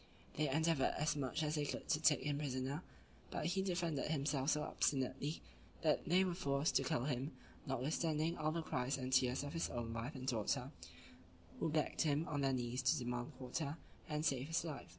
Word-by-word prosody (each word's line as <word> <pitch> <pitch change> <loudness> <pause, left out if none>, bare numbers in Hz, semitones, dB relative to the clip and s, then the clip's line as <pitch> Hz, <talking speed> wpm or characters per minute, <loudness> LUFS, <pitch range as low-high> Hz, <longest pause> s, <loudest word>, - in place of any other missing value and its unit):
They 150 -1 +1
endeavored 160 0 +2
as 150 0 +1
much 140 +2 -1
as 150 0 0
they 150 -2 +1
could - - -4
to 150 - +2
take 155 -2 +5
him 145 0 0
prisoner, 135 +1 -2 0.5
but - - -3
he 185 +4 +1
defended 175 -7 0
himself 140 -2 +1
so 150 -1 +2
obstinately, 140 +2 0 0.4
that 155 0 +2
they 180 +3 +6
were 185 -2 0
forced 145 -4 +1
to - - +1
kill 155 -7 0
him, 135 +1 -1 0.3
notwithstanding 155 +5 0
all 155 -1 0
the 165 0 -2
cries 130 -1 -1
and 130 -1 -3
tears 130 +1 +3
of 145 - -5
his 165 - 0
own 115 -1 -3
wife 115 +6 -4
and 130 -1 -5
daughter, 125 +2 0 0.9
who 165 - +1
begged 155 0 +1
him, 155 +1 +2
on 145 -2 -1
their 135 -1 +3
knees, 125 0 -1
to 130 +4 +3
demand 125 +2 -3
quarter, 140 +4 -3 0.3
and 150 0 -1
save 135 -1 +1
his 160 0 +1
life. 155 -4 -5
145 Hz, 195 wpm, -39 LUFS, 130-155 Hz, 0.9 s, they